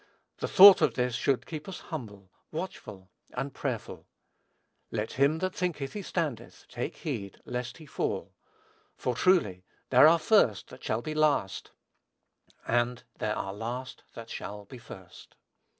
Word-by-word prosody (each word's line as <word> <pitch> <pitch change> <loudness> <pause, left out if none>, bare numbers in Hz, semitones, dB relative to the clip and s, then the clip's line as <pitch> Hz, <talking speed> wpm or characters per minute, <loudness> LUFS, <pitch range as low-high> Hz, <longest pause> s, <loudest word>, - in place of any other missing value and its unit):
The - - -2
thought 195 0 +10
of - - +2
this 125 -1 0
should 135 +1 0
keep 155 +1 -7
us 185 - -7
humble, 100 - -7 0.2
watchful, 110 - -7 0.2
and 135 +2 -4
prayerful. - - -5 0.8
"Let 110 -1 -3
him 140 +4 +2
that 185 +2 -2
thinketh 155 -7 -3
he 210 - -4
standeth 160 - -4
take - - -5
heed 100 -1 -5
lest 125 0 -4
he 160 - -12
fall," 140 - -3 0.6
for 125 - -1
truly, 120 - +2 0.3
"there 130 +4 +8
are 165 +1 +6
first 155 - +3
that - - -13
shall 110 +2 -1
be 155 - -4
last, 150 -10 +1 1.0
and 120 +1 0 0.2
there 105 0 -1
are 95 - -3
last 120 +5 -6
that 115 -1 -9
shall 105 0 -6
be 125 +4 -11
first." 95 -6 -13
125 Hz, 150 wpm, -29 LUFS, 110-155 Hz, 1.0 s, thought